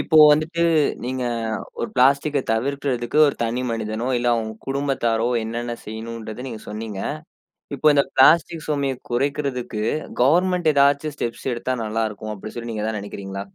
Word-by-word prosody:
இப்போ 160 - +1 0.2
வந்துட்டு 160 +3 0 0.4
நீங்க 130 0 -2 0.6
ஒரு 120 - -2
பிளாஸ்டிக்க 140 +3 +3
தவிர்கறத்துக்கு 130 +1 -1
ஒரு - - -2
தனி 120 +3 -1
மனிதனோ 110 +1 -3
இல்ல 120 0 0 0.4
குடும்பத்தாரோ 135 -5 0 0.2
என்னென்ன 120 +1 -4
செய்யணும்றத 110 +2 -6
நீங்க 110 -3 -7
சொன்னீங்க. 105 -2 -5 0.7
இப்போ 150 +3 +3
இந்த 140 - +5
பிளாஸ்டிக் 165 +4 +5
சுமையை 140 -3 0 0.2
குறைக்கறதுக்கு 130 -3 -1 0.4
கவர்ன்மென்ட் 175 +4 +3
ஏதாவது 140 +2 +3
ஸ்டெப்ஸ் 120 +1 -4
எடுத்தா 125 +2 -2
நல்லா 110 +1 -1
இருக்கும் 110 +1 -7
அப்படின்னு 110 +4 -9
சொல்லி 115 0 -5
நீங்க 105 -1 -3
எதாவது 110 -1 -2
நனைக்கிறீங்களா? 100 -1 -6
125 Hz, 135 wpm, -22 LUFS, 110-140 Hz, 0.7 s, இந்த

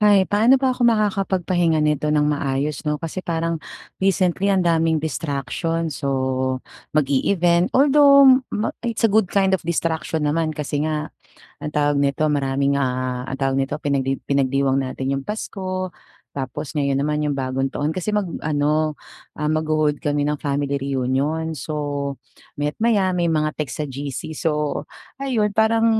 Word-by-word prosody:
Hay, 205 -2 +5
paano 225 +6 +4
ba 265 -1 +1
ako 250 - -3
makakapagpahinga 190 -6 +1
nito 150 0 +1
ng 150 -1 +3
maayos, 140 0 -1
'no. 150 - +1
Kasi 165 +3 -5
parang 165 -2 -2 0.4
recently 190 0 +2
ang 190 -2 +2
daming 165 -1 +2
distractions. 155 +2 -3
So 130 -2 0 0.4
mag-e-event, 170 +5 +2
although 280 -1 +7
ma 210 - -1
it's 230 -1 -2
a 225 - +5
good 215 -3 +3
kind 195 0 +2
of 190 - 0
distraction 160 -1 -1
naman, 160 +2 +1
kasi 145 -1 -2
nga, 155 -1 -3 0.5
anong 150 - -6
tawag 145 -1 +2
nito, 140 +1 +1
maraming, 140 -1 +1
ah, 130 -1 -1
ang 135 0 -5
tawag 135 0 +1
nito, 135 +1 -1
pinagdi 135 -2 0
pinagdiwang 135 -1 +1
natin 135 +1 -2
'yong 135 - -8
Pasko, 185 -3 -4 0.4
tapos 140 +2 -5
ngayon 140 -1 +1
naman 150 +1 0
'yong 145 - 0
Bagong 135 0 -1
Taon. 145 +1 0
Kasi 185 +5 -2
mag-ano, 155 -5 0 0.4
magho-hold 155 -1 0
kami 145 0 0
ng 150 - -2
family 140 0 -1
reunion. 140 +4 -1
So 155 - -5 0.8
maya't 145 +1 -3
maya 215 -4 +2
may 175 -1 0
mga 155 -2 +1
text 150 0 -3
sa - - -2
GC. 140 +2 -5
So 150 -2 -1 0.4
ayun, 245 -6 0
parang 220 +2 +3
155 Hz, 150 wpm, -22 LUFS, 140-185 Hz, 0.8 s, although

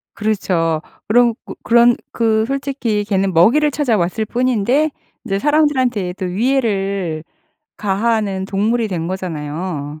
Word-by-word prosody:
그렇죠. 175 -7 0 0.3
그런 235 +1 +4
고 - - -8
그런 235 +1 +5 0.2
그 220 -1 +2
솔직히 270 -6 -2
걔는 195 -2 0
먹이를 255 - +4
찾아왔을 220 - 0
뿐인데 250 +5 +1 0.4
이제 195 -4 -1
사람들한테도 255 -11 +1
위해를 195 - -1 0.6
가하는 205 -1 0
동물이 215 +4 0
된 170 -4 -3
거잖아요. 155 -4 -5
210 Hz, 275 characters per minute, -18 LUFS, 185-240 Hz, 0.6 s, 그런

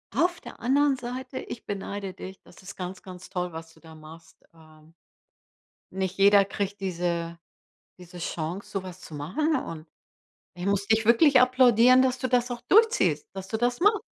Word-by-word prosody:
Auf 345 +6 +1
der - - -12
anderen 275 +2 +2
Seite, 255 +2 -6
ich 235 - -8
beneide 200 -1 -5
dich. 190 +1 -10
Das - - -17
ist 190 - -10
ganz, 185 0 -7
ganz 185 -1 -11
toll, 180 -2 -4
was 160 0 -9
du 160 - -22
da 160 -1 -14
machst. 155 +1 -15
Ähm, 155 -1 -20 1.0
nicht 190 0 -4
jeder 200 0 +6
kriegt 200 0 -4
diese 170 -2 -3 0.6
diese 180 0 -12
Chance, 170 +3 -5
so 195 - -3
was 185 -1 -10
zu 155 - -11
machen 280 - -1
und 165 -10 -6 0.7
ich 180 +2 -6
muss 200 0 0
dich 220 0 +2
wirklich 260 +4 +6
applaudieren, 255 0 +5
dass 255 -1 0
du 255 0 -2
das 250 0 +1
auch 240 -1 -5
durchziehst, 450 +1 +3
dass 190 0 -8
du 220 - -2
das 240 +3 -1
machst. 415 +3 +3
200 Hz, 180 wpm, -26 LUFS, 175-250 Hz, 1.0 s, jeder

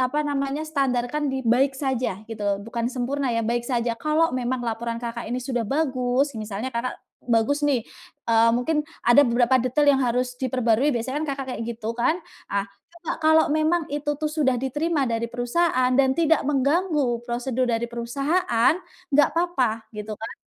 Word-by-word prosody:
apa 260 +4 +1
namanya, 275 0 -1
standarkan 275 -1 0
di 265 - -2
baik 260 +4 +3
saja 255 -8 -1
gitu 225 -2 -6
loh. 200 -1 +1
Bukan 235 0 -2
sempurna 265 +2 -1
ya, 230 - +1
baik 240 +1 0
saja. 240 -1 0
Kalau 305 +5 +2
memang 255 0 -1
laporan 230 0 -3
Kakak 235 0 -5
ini 245 +2 -2
sudah 245 -2 -2
bagus, 265 +1 0
misalnya 215 +2 -4
Kakak 240 +2 -2 0.3
bagus 230 +5 +2
nih, 270 -6 +1 0.4
eee, 230 0 +5
mungkin 300 +5 +1 0.2
ada 240 +4 +7
beberapa 245 0 +3
detail 275 +4 +1
yang - - 0
harus 250 0 0
diperbarui. 255 0 +2
Biasanya 260 +5 -2
kan - - -2
Kakak 270 -1 -5
kayak 230 - -4
gitu 230 -1 -4
kan? 245 +7 +2 0.3
Ah, 200 0 0 0.3
coba 340 -1 -5
kalau 315 0 +5
memang 315 +2 +2
itu 295 0 -1
tuh 310 - -2
sudah 295 -5 +1
diterima 295 +3 0
dari 230 0 -1
perusahaan 250 +2 +1
dan 265 0 +4
tidak 325 -2 +3
mengganggu 285 -3 +1
prosedur 245 +1 -1
dari 230 0 0
perusahaan, 240 +3 +1 0.4
enggak 295 +1 +5
apa-apa, 255 -11 0
gitu 210 +1 -5
kan, 225 - -7
255 Hz, 170 wpm, -24 LUFS, 235-290 Hz, 0.4 s, ada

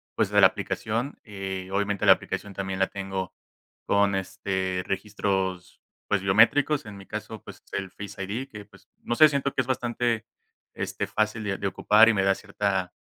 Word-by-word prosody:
pues, - - +1
de - - +3
la - - +9
aplicación, 115 +6 -3
eh, 95 -2 -5
obviamente, 100 0 0
la - - +10
aplicación 100 -1 -6
también 95 0 -4
la 95 - +3
tengo 95 -2 -5 0.5
con, 100 -1 +3
este, 95 -1 -2
registros, 95 -2 -2 0.3
pues 100 - +2
biométricos. 115 +9 +4
En 105 - -9
mi 100 - -12
caso, 110 -1 -7
pues, - - -12
el 95 -2 -3
Face 100 -1 -7
ID 115 +8 -4
que, 105 -3 -9
pues, 100 - -20 0.2
no 120 - -1
sé, 155 - +8
siento 140 -1 -1
que - - -3
es 125 - -6
bastante 120 -3 -1 0.5
este - - -3
fácil 110 +1 -1
de 100 -1 -2
de 100 - -2
ocupar 105 +3 +5
y - - +4
me 95 -2 +1
da 95 0 +3
cierta 95 -3 -2
100 Hz, 185 wpm, -26 LUFS, 95-110 Hz, 0.5 s, la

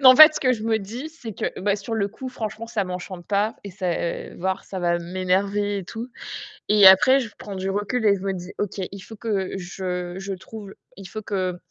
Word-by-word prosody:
non, 260 -2 +10
en - - +2
fait, 310 0 +11
ce - - -2
que 255 -2 +4
je 220 -3 -3
me 220 -1 +2
dis, 230 +9 -6
c'est 275 -9 -8
que, - - -3
bah, 200 +1 +2
sur 225 +3 -4
le 200 -2 +1
coup, 255 +5 -7
franchement, 225 -1 -5
ça 215 -4 0
m'enchante 180 -1 -6
pas 210 +2 +1
et 200 - -6
ça, 185 -1 -2
heu, 170 - -4
voire 190 +2 -1
ça 190 - -6
va 175 -1 +1
m'énerver 195 +3 0
et 190 - -6
tout. 230 +6 -6 0.6
Et 205 -2 +8
après, 260 +8 +8
je 235 - -3
prends 200 -2 -7
du 190 +1 -2
recul 205 +4 -1
et 200 - +6
je 190 - -7
me 195 0 -1
dis: 180 0 -7
«OK, 205 -1 -2
il 195 - -8
faut 220 - -10
que 200 -4 -2
je 180 -1 -4
je 195 0 -4
trouve 195 +2 -9
l - - -12 0.2
il 195 - -9
faut 215 - -5
que 185 -3 -2
200 Hz, 245 wpm, -24 LUFS, 185-220 Hz, 0.6 s, fait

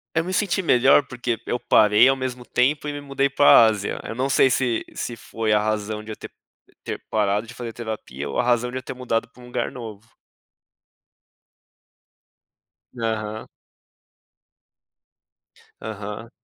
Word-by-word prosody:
Eu 160 - +3
me 185 - -4
senti 190 -1 0
melhor 135 -1 +5
porque 120 -2 -3
eu 120 - -2
parei 105 +1 +5
ao 135 - +4
mesmo 130 -2 -5
tempo 140 +4 +1
e - - -2
me 145 - -6
mudei 140 -1 0
pra 140 -3 +7
Ásia. 105 -2 -1
Eu - - -5
não 130 +3 -1
sei, 135 - +5
se 125 -3 0
se 120 - -4
foi 110 -1 -3
a 105 - +4
razão 105 0 -2
de 110 - -7
eu - - -8
ter - - -10 0.5
ter - - -5
parado 105 0 +1
de - - -10
fazer 120 -2 -6
terapia 105 - -6
ou - - -4
a - - +4
razão 120 0 +1
de 125 - -7
eu - - -8
ter - - -7
mudado 125 -3 -2
pra 125 +2 -18
um - - -12
lugar 125 - -2
novo. 115 -3 -9 2.9
Aham. 110 -1 -3 2.4
Aham. 105 +1 -7
115 Hz, 160 wpm, -23 LUFS, 110-130 Hz, 2.9 s, pra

